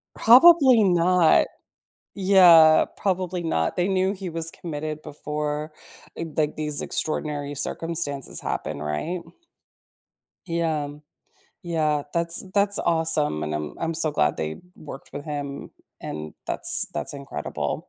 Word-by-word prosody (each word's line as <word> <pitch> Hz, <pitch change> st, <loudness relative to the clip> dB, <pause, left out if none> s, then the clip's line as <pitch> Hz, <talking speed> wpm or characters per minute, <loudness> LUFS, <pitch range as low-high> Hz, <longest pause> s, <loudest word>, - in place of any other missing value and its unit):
Probably 260 Hz, -1 st, +7 dB
not. 175 Hz, -2 st, +4 dB, 0.7 s
Yeah, 175 Hz, -5 st, +6 dB
probably 185 Hz, -2 st, -2 dB
not. 80 Hz, -, -1 dB
They 180 Hz, +1 st, 0 dB
knew 190 Hz, 0 st, +1 dB
he 190 Hz, -2 st, -6 dB
was 165 Hz, 0 st, -2 dB
committed 155 Hz, -2 st, -6 dB
before, 150 Hz, 0 st, -4 dB, 0.4 s
eh, -, -, -4 dB
g 165 Hz, -, -7 dB
like, 155 Hz, -1 st, 0 dB
these 150 Hz, -1 st, -2 dB
extraordinary 145 Hz, -2 st, -3 dB
circumstances 145 Hz, -1 st, -4 dB
happen, -, -, -4 dB
right? 75 Hz, -, -3 dB, 1.3 s
Yeah. 165 Hz, -4 st, -1 dB, 0.7 s
Yeah. 155 Hz, -4 st, 0 dB
That's 170 Hz, +1 st, +1 dB
that's 200 Hz, 0 st, +2 dB
awesome, 160 Hz, -, 0 dB
and 75 Hz, 0 st, -3 dB
I'm 75 Hz, -1 st, -4 dB
I'm 165 Hz, 0 st, -2 dB
so 160 Hz, -1 st, +1 dB
glad 75 Hz, -, +1 dB
they 80 Hz, 0 st, -4 dB, 0.2 s
worked 140 Hz, -2 st, -11 dB
with 145 Hz, -, -7 dB
him, 145 Hz, -2 st, -6 dB, 0.3 s
and 75 Hz, 0 st, -7 dB
that's -, -, 0 dB
that's 75 Hz, -, -3 dB
incredible. 135 Hz, -, -5 dB
160 Hz, 125 wpm, -24 LUFS, 145-175 Hz, 1.3 s, Probably